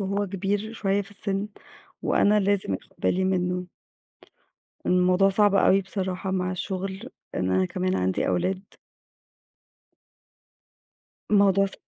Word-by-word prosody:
وهو 200 +1 -1
كبير 200 +3 -2
شوية 200 -2 0
في 200 - -14
السِن 200 0 -2 0.5
وأنا 210 +1 +3
لازم 195 - +1
آخُد - - -9
بالي 185 - +1
منّه. 180 -1 0 1.2
الموضوع 180 +2 +4
صعب 205 +1 +4
أوي 195 0 +4
بصراحة 190 -1 -3
مع 185 -1 -1
الشُغل 190 +5 -5 0.3
إن 90 0 -1
أنا 95 0 +2
كمان 95 +1 -1
عندي 95 0 0
أولاد. 185 - 0 2.7
الموضوع 200 -1 +4
ص 195 - +4
190 Hz, 115 wpm, -25 LUFS, 180-200 Hz, 2.7 s, الموضوع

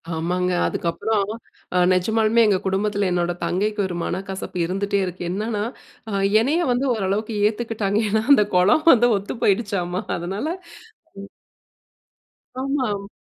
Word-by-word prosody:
ஆமாங்க 180 +3 -1 0.2
அதுக்கப்புறம் 200 +5 -1 0.5
அ - - +3 0.2
நெஜமாலுமே 220 +5 +2
எங்க 200 -2 +3
குடும்பத்தில 200 +1 0
என்னோட 175 0 0
தங்கைக்கு 210 +4 -1
ஒரு 180 - -5
மனக்கசப்பு 190 0 -5
இருந்துட்டே 200 +3 -1
இருக்கு. 180 0 -6
என்னன்னா, 210 +2 -2 0.5
அ - - -5 0.3
என்னைய 295 +9 +1
வந்து 245 +3 0
ஓரளவுக்கு 215 +1 -2
ஏத்துக்கிட்டாங்க. 215 -2 -2
ஏன்னா 220 +1 +1
அந்த 210 -6 +5
குலம் 190 +13 +4
வந்து 240 0 +4
ஒத்து 200 +4 -6
போயிடுச்சாம்மா 195 -3 0 0.2
அதனால 190 - -4 0.8
ம். 200 - -10 1.3
ஆமாம். 255 -8 -2
200 Hz, 120 wpm, -22 LUFS, 185-220 Hz, 1.3 s, அந்த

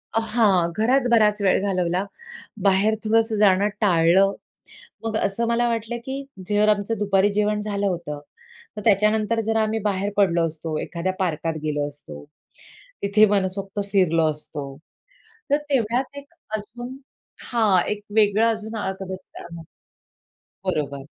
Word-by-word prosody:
हां, 215 -6 +2
घरात 250 +4 +2
बराच 210 -2 +4
वेळ 195 -2 +3
घालवला. 185 -2 0 0.6
बाहेर 200 +2 +3
थोडंसं 225 0 +2
जाणं 200 -1 +4
टाळलं. 190 0 +4 0.7
मग 225 -1 -2
असं 220 +2 0
मला 235 +1 +2
वाटलं 230 0 -2
की 265 +1 -4 0.3
जर 210 0 +3
आमचं 210 +1 +1
दुपारी 200 0 +2
जेवण 210 0 +1
झालं 200 -1 -1
होतं, 165 -6 -3 0.6
तर 210 - -5
त्याच्यानंतर 215 +1 +2
जर 225 - +1
आम्ही 220 +1 0
बाहेर 200 0 -1
पडलो 170 -4 +3
असतो, 160 0 -5
एखाद्या 175 +2 -3
पार्कात 165 -3 -1
गेलो 150 -1 -1
असतो, 75 - -11 0.8
तिथे 210 +2 +5
मनसोक्त 195 0 -1
फिरलो 165 -5 +3
असतो, 150 -1 -6 0.9
तर 285 - +5
तेवढ्यात 255 +1 0
एक 280 +3 -11 0.2
अजून 240 +5 -8 0.5
हां, 215 -6 +3
एक 210 0 -4
वेगळं 210 +1 +4
अजून 220 0 -5
हा 205 -3 -2
कदाचित 190 -1 -7
त्या - - -10
मग 165 - -9 1.0
बरोबर. 145 -6 -2
205 Hz, 135 wpm, -23 LUFS, 185-220 Hz, 1.0 s, तिथे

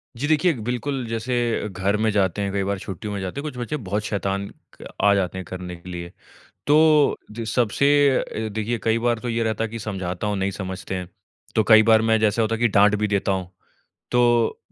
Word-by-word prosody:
जी 135 +5 -2
देखिए, 155 +2 +3
बिल्कुल 125 +1 -2
जैसे 115 -1 -1
घर 95 +2 -1
में 110 +1 +1
जाते 100 -1 +1
है 100 - -1
कई 100 0 -1
बार 100 0 -2
छुट्टियों 105 +3 -6
में 100 - -3
जाते 95 +8 -4
हैं - - -11
कुछ 125 - -13
बच्चे 125 +5 -3
बहुत 105 -3 -3
शैतान 100 -1 -2 0.3
क - - -9 0.2
आ 100 - +6
जाते 95 -1 -1
है 95 - -4
करने 90 0 -7
के 85 +1 -12
लिए। 85 -1 -6 0.6
तो 150 0 +5
जो 115 +1 -6
सबसे 120 +4 +1 0.3
अ, 110 0 -4
देखिए 110 +3 -2
कई 115 0 +2
बार 120 -1 0
तो 120 +1 -4
ये 115 0 0
रहता 110 0 -1
है 115 - -2
कि 115 +1 -6
समझाता 95 -2 -4
हूँ, 105 -1 -1
नहीं 95 +1 -1
समझते 95 -1 -5
है। 90 -1 -5 0.5
तो 110 - +4
कई 110 -1 +8
बार 110 0 +5
मैं 110 0 +2
जैसा 110 +1 +2
होता 115 +1 +1
है - - -7
कि 120 - +5
डाँट 105 0 +4
भी 105 +1 0
देता 100 -1 0
हूँ। 95 -2 -3 0.6
तो, 120 -2 +2
110 Hz, 225 wpm, -23 LUFS, 95-115 Hz, 0.6 s, कई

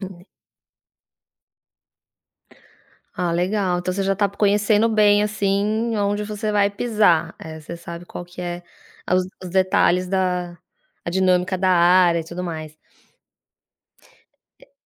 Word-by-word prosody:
Hum. 185 -2 -9 2.9
Ah, 180 -1 -1
legal, 180 +1 0
então 180 +1 -2
você 195 +2 -2
já 195 0 +1
está 205 +1 +1
conhecendo 210 +2 +2
bem 210 -2 +4
assim 210 +2 0
onde 205 +1 -1
você 215 +1 -3
vai 205 -1 +2
pisar, 200 -7 +1
eh, 160 0 -9
você 170 +3 -8
sabe 170 +1 -9
qual 175 - -8
que 175 +1 -11
é 175 0 -5 0.5
os 185 0 +1 0.2
os 180 - -7
detalhes 185 -1 +2
da 180 -2 -1 0.5
a 170 - -3
dinâmica 185 0 +1
da 190 0 +1
área 175 -1 +4
e - - -8
tudo 170 +2 -7
mais. 155 -3 -6 1.9
É - - -22
185 Hz, 130 wpm, -21 LUFS, 175-205 Hz, 2.9 s, bem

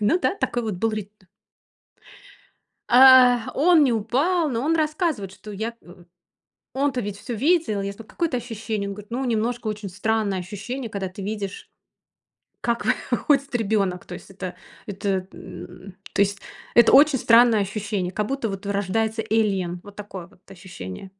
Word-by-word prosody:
ну 210 - +3
да, 370 - 0
такой 240 - -1
вот 215 -3 -3
был 225 +5 0
рит 210 -2 -5 1.8
А, 250 -2 +7
он 325 +2 +5
не 260 - +2
упал, 280 - +1
но 235 -3 -2
он 330 +2 +2
рассказывает, 305 - -1
что 210 +2 -12
я 220 +4 -4
у 175 +1 -15 0.7
у 265 - -6
он-то 275 -3 +1
ведь 205 -3 -5
всё 240 - -6
видел. 285 - +1
Я 200 0 -3
сказала: 215 +2 -13
"Какое 335 -2 -1
это 255 - -2
ощущение?" 225 -3 -4
Он 200 - -5
говорит: 210 +1 -12
"Ну, 255 +3 -2
немножко 235 0 -1
очень 210 -1 -4
странное 205 0 -1
ощущение, 220 +6 -6
когда 200 -3 -3
ты 185 +2 -9
видишь, 200 -1 -5 0.9
как 235 -1 -1
выходит 275 +1 +1
ребенок". 200 -5 0
То 180 - -8
есть - - -11
это 185 -2 -6 0.3
это, 195 -2 -2
м, 180 +2 -11 0.2
то - - +4
есть 200 0 -1 0.3
это 235 - +6
очень 285 0 +6
странное 235 -2 +5
ощущение, 200 -2 -3
как 210 +2 -1
будто 270 -2 -2
вот 195 0 -6
рождается 205 +3 -1
alien. 195 -6 0
Вот 205 -1 -13
такое 195 -4 -8
вот 185 - -24
ощущение. 180 - -9
215 Hz, 165 wpm, -23 LUFS, 195-245 Hz, 1.8 s, А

